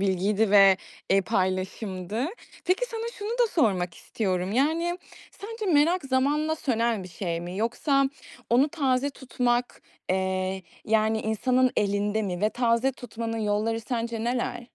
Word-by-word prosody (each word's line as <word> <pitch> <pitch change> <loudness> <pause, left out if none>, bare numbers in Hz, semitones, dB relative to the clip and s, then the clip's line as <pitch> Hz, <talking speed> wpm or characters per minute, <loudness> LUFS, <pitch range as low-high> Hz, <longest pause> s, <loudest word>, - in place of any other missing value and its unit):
bilgiydi 195 +2 +1
ve, 195 -2 +7 0.3
eee, 195 +1 +5
paylaşımdı. 190 +2 -2 0.4
Peki, 370 +7 +2
sana 455 -1 -5
şunu 415 0 -4
da 480 +1 +2
sormak 185 - +1
istiyorum: 185 -2 -2
Yani, 325 +8 +1 0.3
sence 435 +1 -7
merak 315 +3 +3
zamanla 290 +4 +1
sönen 230 -7 0
bir 185 - -9
şey 170 -1 -3
mi? 175 +2 -6
Yoksa 275 +6 +1 0.5
onu 255 +5 +4
taze 280 -3 0
tutmak, 245 -2 -1 0.3
eee, 190 0 -1 0.2
yani, 220 0 +2
insanın 255 +4 +2
elinde 205 +1 +1
mi 180 -3 -3
ve 210 +1 +2
taze 240 +2 +2
tutmanın 230 -2 -5
yolları 215 +1 0
sence 230 -1 -3
neler? 245 0 -1
230 Hz, 135 wpm, -26 LUFS, 195-270 Hz, 0.5 s, ve